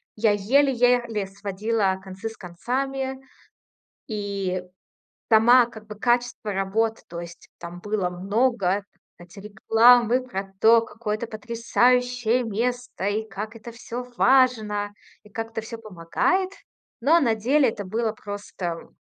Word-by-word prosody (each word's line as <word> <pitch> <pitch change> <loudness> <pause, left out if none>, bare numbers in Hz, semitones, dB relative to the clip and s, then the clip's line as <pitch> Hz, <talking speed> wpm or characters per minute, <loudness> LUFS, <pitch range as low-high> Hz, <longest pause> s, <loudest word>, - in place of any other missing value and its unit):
я 215 0 +3
еле-еле 240 -1 +2
сводила 200 0 -1
концы 195 +3 -6
с 225 - -13
концами. 265 +8 -3 0.9
И 200 -3 -3 0.7
сама 235 +3 +6
как 220 -2 -13
бы 210 - -8
качество 240 -1 0
работ, 220 +4 0
то 170 0 -6
есть 170 0 -11
там 170 +1 -8
было 205 -3 -1
много- 200 +1 0 0.4
эти 175 +2 -14
рекламы 230 +4 +4
про 195 -5 -5
то, 230 +1 +7
какое 225 -2 -4
это 235 - -5
потрясающее 245 +2 +1
место, 240 -1 -3
и 215 +2 -1
как 210 +2 -6
это 230 +1 -10
всё 240 +1 -6
важно, 220 -6 +3 0.3
и - - -17
как 225 +1 -5
это 225 - -3
всё 225 +1 -8
помогает. 225 - -1 0.5
Но 310 +8 +4
на 235 -7 +2
деле 260 +5 +3
это 215 -3 -4
было 220 +3 -1
просто 205 -5 -6
220 Hz, 130 wpm, -24 LUFS, 200-245 Hz, 0.9 s, то